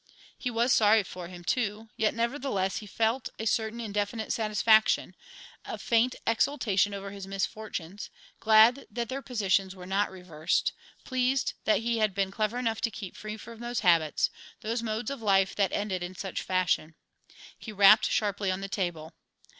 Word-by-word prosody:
He 250 - -3
was 240 +1 +2
sorry 215 -1 +5
for 180 -2 -8
him, 175 -1 -11
too, 220 +1 -1
yet, 220 +1 +1
nevertheless, 235 -5 -1
he 210 - -7
felt 225 +4 0
a 220 - -4
certain 220 +1 0
indefinite 210 0 -2
satisfaction, 220 0 +3 0.5
a - - -6
faint 235 +2 +2
exultation 215 -4 +1
over 200 0 -6
his 195 -1 -8
misfortunes, 195 -1 -4 0.3
glad 225 +4 +5
that 235 -1 -4
their 270 +1 -3
positions 195 -6 0
were 180 -1 -10
not 195 +2 0
reversed, 180 -4 -1 0.3
pleased 260 0 0
that 215 - +3
he 230 0 0
had 215 -3 +1
been 195 -1 0
clever 215 +3 -1
enough 225 -3 -1
to 230 - +1
keep 195 -4 -8
free 215 0 -6
from 230 +1 -11
those 240 -1 -3
habits, 165 -5 +3 0.3
those 225 +2 -2
modes 220 +2 -3
of 275 -4 -6
life 195 -2 +3
that 200 -2 +1
ended 195 -3 -2
in 175 +1 -6
such 190 0 -4
fashion. 180 -4 0 0.6
He 220 - -9
rapped 205 +1 +6
sharply 200 -2 0
on 185 +1 -2
the 195 - -4
table. 175 -5 -3
215 Hz, 170 wpm, -28 LUFS, 195-230 Hz, 0.6 s, rapped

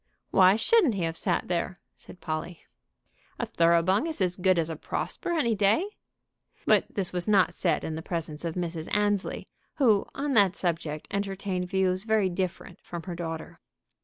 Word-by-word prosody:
"Why 190 0 +6
shouldn't 300 - +3
he 185 - -1
have 165 0 -1
sat 175 0 -1
there?" 175 0 -2
said 180 - -14
Polly. 160 +1 -5 0.7
"A - - -2
Thoroughbung 170 - +3
is 320 - -4
as 180 -2 +1
good 185 -1 +2
as 165 -1 0
a - - -4
Prosper 160 - -4
any 235 -7 +2
day." 210 - +3 0.8
But - - +4
this 190 -3 -1
was 180 +1 -2
not 200 -3 +4
said 175 - 0
in 160 - -3
the 160 - -4
presence 160 -3 -4
of 165 -1 -3
Mrs. 170 -2 -4
Annesley, 205 -2 0 0.3
who 225 -8 +3
on 285 0 -1
that 200 -5 +5
subject 165 -5 -2
entertained 195 -2 -2
views 190 0 +1
very 220 -3 +2
different 185 0 -4
from 170 -1 -7
her 180 - -5
daughter. 165 -2 -6
185 Hz, 170 wpm, -27 LUFS, 170-200 Hz, 0.8 s, Why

